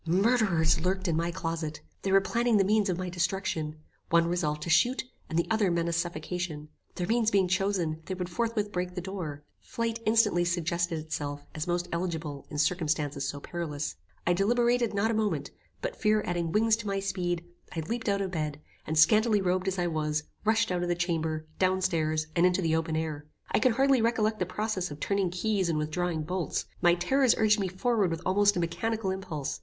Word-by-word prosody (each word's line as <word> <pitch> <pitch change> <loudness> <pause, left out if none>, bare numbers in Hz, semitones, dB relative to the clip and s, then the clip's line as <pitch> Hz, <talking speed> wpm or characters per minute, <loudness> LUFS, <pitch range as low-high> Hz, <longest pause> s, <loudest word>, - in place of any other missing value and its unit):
Murderers 190 -4 +3
lurked 190 +1 0
in 165 - +1
my 170 +1 0
closet. 165 -3 -3 0.2
They 195 - -1
were 195 0 +6
planning 235 +2 +2
the 195 - +5
means 210 +1 +2
of 180 - 0
my 185 0 -3
destruction. 175 -3 -1 0.3
One 170 0 +4
resolved 155 -3 -1
to 165 - -4
shoot, 245 +10 +3 0.3
and 160 - -2
the 170 - +2
other 215 -3 +3
menaced 170 -1 0
suffocation. 170 -2 -4 0.3
Their 180 - -2
means 225 +2 +2
being 195 -3 +3
chosen, 185 -4 0
they 185 - -2
would 180 -1 -3
forthwith 215 +2 -1
break 180 -1 -3
the - - -2
door. 170 -6 -5 0.2
Flight 230 0 -3
instantly 215 -5 +4
suggested 170 0 0
itself 145 -2 -4
as 155 +2 -4
most 175 0 0
eligible 160 -5 -3
in 150 - -6
circumstances 150 -3 0
so 145 - -4
perilous. 150 -2 -4 0.3
I 175 - +3
deliberated 235 +4 +2
not 210 +3 +2
a - - 0
moment; 200 -10 -1 0.3
but, - - -2
fear 215 -1 +2
adding 175 -2 -1
wings 220 +2 +4
to 220 -2 -6
my 195 0 0
speed, 175 -3 -2 0.3
I 165 - -1
leaped 225 +7 -3
out 200 0 +1
of 190 -2 -2
bed, 150 -4 -3 0.3
and 155 - -1
scantily 215 +7 +5
robed 185 0 0
as 190 0 0
I 175 - +1
was, 155 -2 -1 0.2
rushed 220 0 +2
out 180 -1 0
of 175 - -1
the 175 - +2
chamber, 160 -3 -1
down 185 0 +3
stairs, 155 -4 0
and 170 - +3
into 180 +1 +3
the 160 -1 +2
open 160 0 -1
air. 155 -2 -3 0.2
I - - +3
can 245 +2 +3
hardly 270 0 +3
recollect 220 -1 +1
the 180 - 0
process 190 -1 -2
of 145 0 -8
turning 200 0 0
keys, 190 0 0
and 160 - +1
withdrawing 160 +1 -1
bolts. 180 +1 -2 0.2
My 175 0 +5
terrors 255 +8 +3
urged 215 -1 +4
me 195 - 0
forward 200 +1 +1
with 165 +1 -4
almost 205 +1 +3
a - - +1
mechanical 190 +5 -1
impulse. 155 - -4
180 Hz, 205 wpm, -29 LUFS, 160-205 Hz, 0.3 s, were